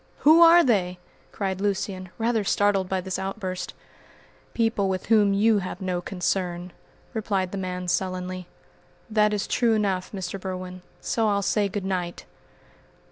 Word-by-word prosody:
"Who 315 +3 +7
are 340 +1 +8
they?" 185 - +1 0.3
cried 190 -2 -3
Lucian, 190 -2 -2
rather 225 -1 +1
startled 195 -1 +2
by 190 -1 0
this 190 0 -4
outburst. 190 -1 -4 0.8
"People 225 -4 +1
with 185 -1 -2
whom 210 -3 +4
you 215 +1 +4
have 185 -1 -5
no 185 -2 -2
concern," 180 -1 -2 0.4
replied 200 -5 -1
the 200 - -4
man 180 -1 -4
sullenly. 185 0 -2 0.6
"That 210 -1 +3
is 210 -1 -1
true 235 -2 +2
enough, 195 -4 -1
Mr. 190 -1 -5
Berwin, 185 -1 -6 0.2
so 225 -1 0
I'll 200 -1 +1
say 205 0 +1
good 195 0 -4
night!" 180 -2 -3
195 Hz, 145 wpm, -25 LUFS, 185-210 Hz, 0.8 s, are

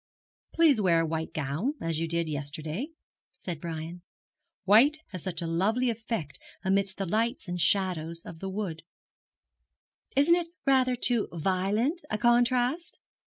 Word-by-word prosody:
'Please 310 -9 +4
wear 170 -4 +4
a - - 0
white 160 0 -3
gown, 155 - -2
as 165 -1 -2
you 165 - -1
did 170 0 0
yesterday,' 155 - -4 0.5
said 170 -4 -6
Brian. 165 +1 -6 0.6
'White 230 +11 +6
has 185 -3 -7
such 175 -1 -4
a - - -2
lovely 215 +9 +1
effect 220 - -5 0.3
amidst 195 0 +1
the 195 - -2
lights 225 +5 -1
and 175 0 -2
shadows 170 -4 0
of 160 - -10
a 195 - -3
wood.' 190 -5 -4 1.3
'Isn't 285 +5 +5
it 345 -1 +1 0.2
rather 260 -2 +3
too 240 -2 +2
violent 195 - 0
a 215 - -1
contrast?' 245 +7 +2
195 Hz, 145 wpm, -28 LUFS, 165-240 Hz, 1.3 s, White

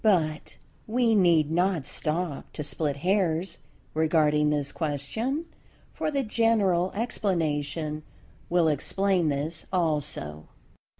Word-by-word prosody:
But 160 -8 +1 0.3
we 235 0 +2
need 170 -7 +4
not 175 -3 +1
stop 160 -1 -2
to 150 - -4
split 145 -1 -2
hairs 185 -2 +1 0.3
regarding 155 -1 +3
this 145 -2 0
question, 165 - -2 0.5
for - - -2
the 280 -2 0
general 210 -6 +2
explanation 155 - -1 0.5
will 175 -2 +3
explain 180 +3 +1
this 150 +3 -3
also. 150 - -1
165 Hz, 105 wpm, -27 LUFS, 150-195 Hz, 0.5 s, need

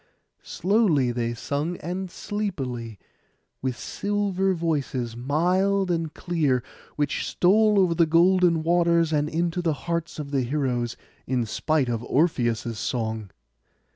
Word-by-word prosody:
Slowly 180 - +2
they 120 -1 -2
sung 145 +8 -3
and 180 +3 -4
sleepily, 135 - -4 0.6
with 130 -2 -2
silver 195 -2 -1
voices, 140 -8 -2
mild 180 +9 +1
and 165 -2 -1
clear, 150 -10 0 0.3
which 145 -1 -1
stole 210 +3 +4
over 180 -3 +3
the 165 -1 +3
golden 170 0 +4
waters, 170 -1 +3
and 150 0 +1
into 170 +2 -1
the 165 -2 +1
hearts 170 -1 -2
of 150 -2 -5
all - - -13
the 135 -2 +1
heroes, 125 -3 -1 0.3
in 125 -2 0
spite 150 +5 0
of 120 -1 -2
Orpheus' 120 -7 0
song. 110 -3 -3
160 Hz, 130 wpm, -25 LUFS, 125-180 Hz, 0.6 s, stole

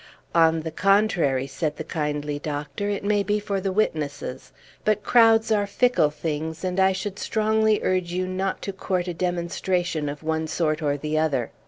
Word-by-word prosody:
"On 165 -1 +4
the 160 0 -5
contrary," 185 -8 +2
said 150 +2 -3
the 155 - -4
kindly 150 -2 -3
doctor, 150 +7 -4
"it 200 -1 -2
may 205 0 +2
be 205 +1 0
for 200 -1 -2
the 195 0 -1
witnesses; 155 -10 -2 0.3
but 215 -1 +1
crowds 225 -2 +5
are 205 -2 +2
fickle 245 -6 +3
things; 160 +1 -4
and 185 0 -1
I 190 0 +5
should 190 +1 -4
strongly 220 0 +2
urge 185 -2 0
you 185 +1 -1
not 185 +1 -2
to 195 - -4
court 185 -1 -2
a 175 - -2
demonstration 175 -2 -1
of 145 +1 -7
one 160 0 -1
sort 155 -1 0
or 145 -1 0
the 155 +2 -1
other. 140 -7 0
175 Hz, 180 wpm, -24 LUFS, 155-200 Hz, 0.3 s, crowds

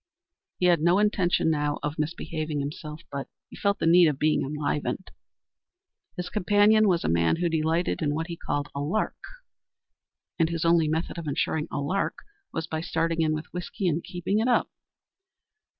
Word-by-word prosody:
He 180 - +1
had 175 -3 +4
no 175 +3 +4
intention 190 -5 +2
now 145 -1 0
of 150 +1 -3
misbehaving 155 -1 -3
himself, 150 +2 -6
but 140 -1 -4 0.2
he - - -10
felt 200 -1 +1
the - - -2
need 170 +1 +7
of 150 -3 0
being 155 +2 +2
enlivened. 150 +5 -2 1.1
His 180 - -3
companion 210 +2 +4
was 175 -3 +2
a - - 0
man 85 0 +3
who 175 +1 0
delighted 165 +2 0
in 145 -2 0
what 160 +1 -2
he 170 -1 -6
called 145 -3 -3
a 140 - -4
lark, 160 +10 -1 1.2
and 165 -1 +3
whose 165 -1 -2
only 165 -1 +4
method 160 +3 -2
of 165 - -6
insuring 150 +2 -1
a - - -3
lark 170 +8 -1 0.4
was 160 - -3
by 160 0 -3
starting 165 -1 0
in 155 -1 +2
with 155 +1 -7
whiskey 180 +2 -3
and 165 0 0
keeping 180 +3 -1
it 225 - +1
up. 250 - +2
165 Hz, 180 wpm, -26 LUFS, 150-180 Hz, 1.2 s, need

